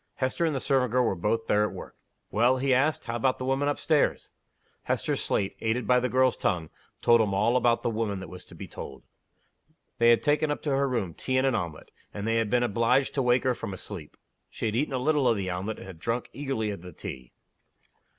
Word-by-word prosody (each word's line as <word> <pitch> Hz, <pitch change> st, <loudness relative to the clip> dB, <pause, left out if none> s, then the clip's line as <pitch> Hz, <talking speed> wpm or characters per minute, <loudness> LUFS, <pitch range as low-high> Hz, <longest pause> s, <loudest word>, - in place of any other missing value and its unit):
Hester 130 Hz, +6 st, 0 dB
and 155 Hz, -, -1 dB
the -, -, 0 dB
servant 130 Hz, -3 st, +1 dB
girl 125 Hz, 0 st, +3 dB
were 115 Hz, -, +1 dB
both 105 Hz, +5 st, -1 dB
there 105 Hz, 0 st, +3 dB
at 105 Hz, -, -2 dB
work. -, -, -9 dB, 0.4 s
"Well?" 120 Hz, +4 st, +3 dB
he 135 Hz, 0 st, +2 dB
asked. 145 Hz, +5 st, +2 dB
"How 115 Hz, -1 st, -4 dB
about 130 Hz, +2 st, +1 dB
the 130 Hz, -, -4 dB
woman 135 Hz, +2 st, +1 dB
up 145 Hz, -, 0 dB
stairs?" 155 Hz, -2 st, +1 dB, 0.5 s
Hester's -, -, 0 dB
slate, 95 Hz, -, 0 dB
aided 115 Hz, +2 st, 0 dB
by 125 Hz, 0 st, +4 dB
the 125 Hz, 0 st, -1 dB
girl's 130 Hz, -2 st, +3 dB
tongue, 80 Hz, -3 st, -1 dB, 0.3 s
told 115 Hz, -1 st, +6 dB
him 100 Hz, -3 st, 0 dB
all 110 Hz, +5 st, +2 dB
about 120 Hz, -2 st, +2 dB
"the -, -, +1 dB
woman" 110 Hz, -3 st, -2 dB
that 95 Hz, -, -7 dB
was 90 Hz, +2 st, -10 dB
to -, -, -14 dB
be -, -, -8 dB
told. -, -, -9 dB, 1.0 s
They 115 Hz, 0 st, +6 dB
had 115 Hz, -, +4 dB
taken 150 Hz, +1 st, +2 dB
up 145 Hz, -, -3 dB
to 150 Hz, -, -1 dB
her 135 Hz, 0 st, +2 dB
room 110 Hz, -9 st, -2 dB
tea 130 Hz, +8 st, -2 dB
and 130 Hz, -, +3 dB
an 135 Hz, -, +2 dB
omelet; 85 Hz, -7 st, -4 dB, 0.2 s
and 105 Hz, +1 st, -3 dB
they 115 Hz, 0 st, +2 dB
had 115 Hz, -2 st, 0 dB
been 125 Hz, +1 st, +2 dB
obliged 120 Hz, +4 st, +2 dB
to 140 Hz, -, 0 dB
wake 125 Hz, 0 st, +3 dB
her 130 Hz, -, +2 dB
from 100 Hz, -4 st, -6 dB
a -, -, -10 dB
sleep. 85 Hz, -6 st, -8 dB, 0.3 s
She -, -, -5 dB
had 110 Hz, -1 st, 0 dB
eaten 135 Hz, +2 st, 0 dB
a -, -, +1 dB
little 145 Hz, +1 st, +2 dB
of 115 Hz, -3 st, +3 dB
the 95 Hz, -2 st, -2 dB
omelet, 95 Hz, +5 st, -3 dB
and -, -, -10 dB
had 95 Hz, -4 st, -10 dB
drunk 115 Hz, +6 st, -2 dB
eagerly 135 Hz, -7 st, -2 dB
of 100 Hz, -, -7 dB
the 90 Hz, -1 st, -10 dB
tea. 65 Hz, -4 st, -8 dB
120 Hz, 245 wpm, -27 LUFS, 105-130 Hz, 1.0 s, told